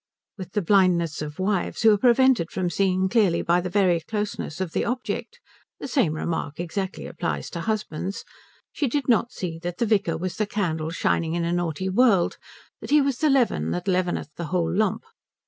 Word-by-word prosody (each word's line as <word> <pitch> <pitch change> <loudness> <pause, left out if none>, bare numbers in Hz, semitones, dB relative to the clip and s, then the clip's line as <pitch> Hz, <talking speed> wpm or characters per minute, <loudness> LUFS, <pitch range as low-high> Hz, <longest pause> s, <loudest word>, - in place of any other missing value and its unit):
With 185 -3 -9
the 210 - 0
blindness 175 -5 +3
of 150 0 -6
wives, 190 +2 -1
who 220 -1 +7
are - - +2
prevented 245 -6 +4
from 180 -2 -2
seeing 190 -1 +1
clearly 190 -5 +2
by 175 +1 +2
the 180 - -4
very 180 -3 +3
closeness 205 -5 -4
of 185 -3 -2
the - - 0
object 255 - -4 0.4
the - - -5
same 215 - +1
remark 155 -2 -3
exactly 185 +3 -4
applies - - -4
to - - -5
husbands 200 -4 -3 0.5
she 290 - -1
did 275 +3 -1
not 235 -1 +2
see 165 -3 -5
that 175 +1 -5
the 235 - +1
vicar 200 -7 +1
was 180 +2 -4
the 215 - 0
candle 160 -7 -2
shining 165 -1 0
in 170 -1 -1
a 170 - 0
naughty 175 +1 -2
world, 195 -2 +3 0.4
that - - -9
he 300 - +6
was 275 -3 0
the 310 - +3
leaven 240 - +2
that 85 +2 -3
leaveneth 180 -5 0
the 170 - -4
whole 170 0 -1
lump. 210 -1 +1
185 Hz, 195 wpm, -24 LUFS, 170-215 Hz, 0.5 s, who